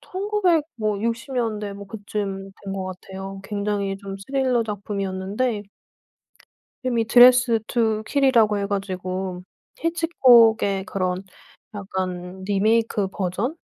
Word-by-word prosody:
1900 375 Hz, -5 st, 0 dB
뭐 215 Hz, -3 st, -1 dB
60 235 Hz, +5 st, -3 dB
년대 215 Hz, -4 st, -2 dB
뭐 200 Hz, 0 st, -9 dB
그쯤 200 Hz, -2 st, -5 dB
된 195 Hz, -, -4 dB
것 195 Hz, -1 st, -3 dB
같아요. 190 Hz, +1 st, -8 dB
굉장히 200 Hz, -1 st, -2 dB
좀 195 Hz, 0 st, -7 dB
스릴러 255 Hz, +3 st, 0 dB
작품이었는데 205 Hz, +2 st, -2 dB, 1.2 s
이름이 240 Hz, -3 st, +1 dB
드레스드 245 Hz, -1 st, +6 dB
투 220 Hz, -3 st, +1 dB
킬이라고 235 Hz, -7 st, +3 dB
해 200 Hz, -, -1 dB
가지고 185 Hz, -2 st, -3 dB, 0.4 s
히치콕의 240 Hz, -, +4 dB
그런 185 Hz, -2 st, -2 dB, 0.5 s
약간 185 Hz, -2 st, -5 dB
리메이크 210 Hz, +1 st, +1 dB
버전? 200 Hz, -, -2 dB
205 Hz, 235 characters per minute, -23 LUFS, 195-235 Hz, 1.2 s, 드레스드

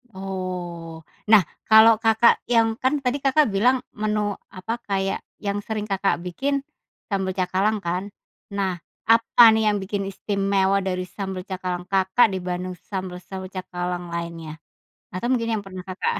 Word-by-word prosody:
Oh, 180 Hz, -4 st, -6 dB, 0.2 s
nah 215 Hz, -3 st, +8 dB, 0.3 s
kalau, 220 Hz, +1 st, +9 dB
Kakak, 225 Hz, +1 st, +4 dB
yang 225 Hz, -2 st, +3 dB
kan 260 Hz, +3 st, +2 dB
tadi, 260 Hz, +3 st, 0 dB
Kakak, 280 Hz, +2 st, +4 dB
bilang 245 Hz, +6 st, +2 dB
menu 210 Hz, -1 st, -1 dB, 0.2 s
apa, 185 Hz, +5 st, -5 dB
kayak 195 Hz, -1 st, -1 dB, 0.2 s
yang 205 Hz, 0 st, -3 dB
sering, 215 Hz, 0 st, -4 dB
Kakak, 195 Hz, -1 st, +1 dB
bikin 275 Hz, +10 st, -2 dB, 0.5 s
sambel 190 Hz, -1 st, 0 dB
cakalang 190 Hz, +4 st, +1 dB
kan? 180 Hz, +4 st, -2 dB, 0.4 s
Nah 190 Hz, -3 st, -1 dB, 0.3 s
apa 230 Hz, 0 st, +7 dB
nih 220 Hz, 0 st, +2 dB
yang 210 Hz, -, +3 dB
bikin 195 Hz, 0 st, -3 dB
istimewa 195 Hz, 0 st, +1 dB
dari 185 Hz, -1 st, -2 dB
sambel 190 Hz, -1 st, -5 dB
cakalang, 180 Hz, -2 st, -4 dB
Kakak, 190 Hz, +4 st, +4 dB
dibanding 180 Hz, 0 st, -3 dB
sambel-sambel 190 Hz, 0 st, -6 dB
cakalang 180 Hz, -1 st, -4 dB
lainnya? 170 Hz, -2 st, -5 dB, 0.6 s
Atau 185 Hz, +6 st, -2 dB
mungkin 230 Hz, -2 st, 0 dB
yang -, -, -10 dB
pernah, 185 Hz, -1 st, -8 dB
Kakak, 185 Hz, 0 st, -2 dB
195 Hz, 140 wpm, -23 LUFS, 185-220 Hz, 0.6 s, kalau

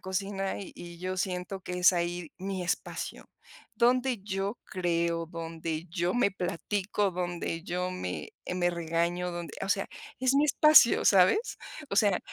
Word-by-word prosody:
cocina 195 Hz, +1 st, -2 dB
y 195 Hz, -, -8 dB
y 170 Hz, -1 st, -10 dB
yo 185 Hz, +1 st, -3 dB
siento 180 Hz, +1 st, -3 dB
que 180 Hz, -, -7 dB
es 180 Hz, -, +7 dB
ahí 175 Hz, -2 st, -2 dB
mi 190 Hz, -1 st, -3 dB
espacio 175 Hz, -, -4 dB, 0.5 s
donde 250 Hz, +1 st, +3 dB
yo 195 Hz, +2 st, -2 dB
creo, 170 Hz, -2 st, -1 dB
donde 165 Hz, -1 st, -5 dB
yo 175 Hz, +2 st, 0 dB
me 245 Hz, -4 st, +3 dB
platico, 195 Hz, +2 st, -1 dB
donde 175 Hz, -2 st, -3 dB
yo 180 Hz, 0 st, -2 dB
me, 90 Hz, -, -5 dB, 0.2 s
eh, -, -, -2 dB
me 175 Hz, -1 st, +2 dB
regaño, 170 Hz, +1 st, -1 dB
donde 170 Hz, -3 st, -6 dB
o 195 Hz, -, -2 dB
sea, 195 Hz, -1 st, +1 dB, 0.3 s
es 260 Hz, +1 st, +3 dB
mi 285 Hz, -, +5 dB
espacio, 305 Hz, -4 st, +6 dB
¿sabes? 195 Hz, -, +4 dB, 0.3 s
O 200 Hz, -, -2 dB
sea, 200 Hz, -4 st, +4 dB
180 Hz, 155 wpm, -29 LUFS, 170-195 Hz, 0.5 s, es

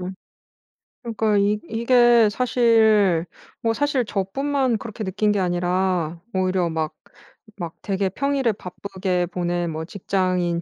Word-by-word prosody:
응. 185 Hz, +1 st, -5 dB, 0.9 s
그러니까 220 Hz, -3 st, 0 dB
이 205 Hz, +1 st, +2 dB
이게 235 Hz, 0 st, +4 dB
사실 220 Hz, -7 st, +3 dB, 0.4 s
뭐 225 Hz, -1 st, +1 dB
사실 280 Hz, -1 st, 0 dB
저뿐만 255 Hz, +6 st, -1 dB
그렇게 220 Hz, 0 st, -7 dB
느낀 205 Hz, +2 st, 0 dB
게 205 Hz, -, 0 dB
아니라 180 Hz, -2 st, 0 dB
오히려 185 Hz, -2 st, +1 dB
막 160 Hz, -1 st, -2 dB, 0.6 s
막 170 Hz, -4 st, -5 dB
되게 195 Hz, -1 st, -1 dB
평일에 275 Hz, 0 st, 0 dB
바쁘게 185 Hz, -1 st, -3 dB
보낸 175 Hz, -1 st, -2 dB
뭐 160 Hz, 0 st, -4 dB
직장인 180 Hz, -1 st, -1 dB
195 Hz, 250 characters per minute, -22 LUFS, 180-225 Hz, 0.9 s, 이게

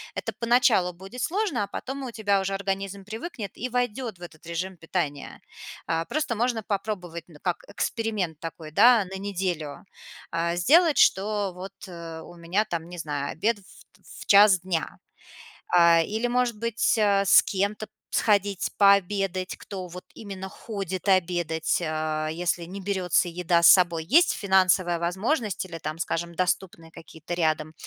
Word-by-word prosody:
Это -, -, -4 dB
поначалу 230 Hz, -6 st, +3 dB
будет 195 Hz, +8 st, -9 dB
сложно, 365 Hz, -, 0 dB
а -, -, -4 dB
потом 270 Hz, +5 st, -6 dB
у 255 Hz, -, -5 dB
тебя 205 Hz, -3 st, +1 dB
уже 195 Hz, +1 st, -2 dB
организм 195 Hz, 0 st, -4 dB
привыкнет 220 Hz, -, -6 dB
и 250 Hz, -, -4 dB
войдет 245 Hz, -4 st, -2 dB
в -, -, -22 dB
этот 165 Hz, -2 st, -12 dB
режим 180 Hz, +3 st, -4 dB
питания. 160 Hz, -4 st, -4 dB, 0.5 s
А, 165 Hz, 0 st, 0 dB
просто 300 Hz, -, -2 dB
можно 235 Hz, 0 st, 0 dB
попробовать, 190 Hz, -5 st, -4 dB
ну, 160 Hz, -4 st, -16 dB
как 180 Hz, -2 st, -2 dB
эксперимент 205 Hz, -6 st, -2 dB
такой, 165 Hz, -1 st, -8 dB
да, 230 Hz, +5 st, +6 dB
на 190 Hz, +1 st, -7 dB
неделю. 185 Hz, -6 st, -4 dB, 0.5 s
А, 170 Hz, +1 st, -1 dB
сделать, 310 Hz, -, +4 dB
что 205 Hz, -1 st, +2 dB
вот, 185 Hz, +1 st, -8 dB
э, 170 Hz, -2 st, -8 dB
у 175 Hz, -, -12 dB
меня, 175 Hz, +5 st, -1 dB
там, 170 Hz, -4 st, -5 dB
не 175 Hz, -, -9 dB
знаю, 145 Hz, -2 st, -3 dB
обед 210 Hz, +6 st, 0 dB
ф -, -, -20 dB, 0.4 s
ф -, -, -30 dB, 0.2 s
в -, -, -8 dB
1:00 200 Hz, -2 st, +7 dB
дня. 180 Hz, -3 st, -3 dB, 0.8 s
А, 170 Hz, -1 st, +6 dB
или, 220 Hz, +8 st, -1 dB
может 245 Hz, -2 st, 0 dB
быть, 230 Hz, 0 st, +1 dB
а, 200 Hz, -2 st, +3 dB
с -, -, +7 dB
кем-то 205 Hz, +2 st, -2 dB, 0.3 s
сходить 200 Hz, -2 st, +1 dB
пообедать, 195 Hz, -2 st, +2 dB
кто 190 Hz, -3 st, -7 dB
вот 180 Hz, +1 st, -10 dB
именно 190 Hz, -2 st, -7 dB
ходит 195 Hz, -3 st, -6 dB
обедать. 175 Hz, -3 st, +1 dB
А, 155 Hz, -1 st, -2 dB
если 170 Hz, +1 st, -2 dB
не 190 Hz, +3 st, -8 dB
берётся 185 Hz, -2 st, +1 dB
еда 170 Hz, 0 st, +1 dB
с -, -, +9 dB
собой. 175 Hz, -4 st, +5 dB
Есть 330 Hz, -, +5 dB
финансовая 185 Hz, -3 st, +2 dB
возможность 195 Hz, -, -1 dB
или, 175 Hz, -3 st, -8 dB
там, 155 Hz, 0 st, -5 dB
скажем, 170 Hz, 0 st, -3 dB
доступные 175 Hz, -2 st, -2 dB
какие-то 160 Hz, +1 st, -8 dB
рядом, 155 Hz, -2 st, 0 dB
190 Hz, 160 wpm, -26 LUFS, 170-210 Hz, 0.8 s, с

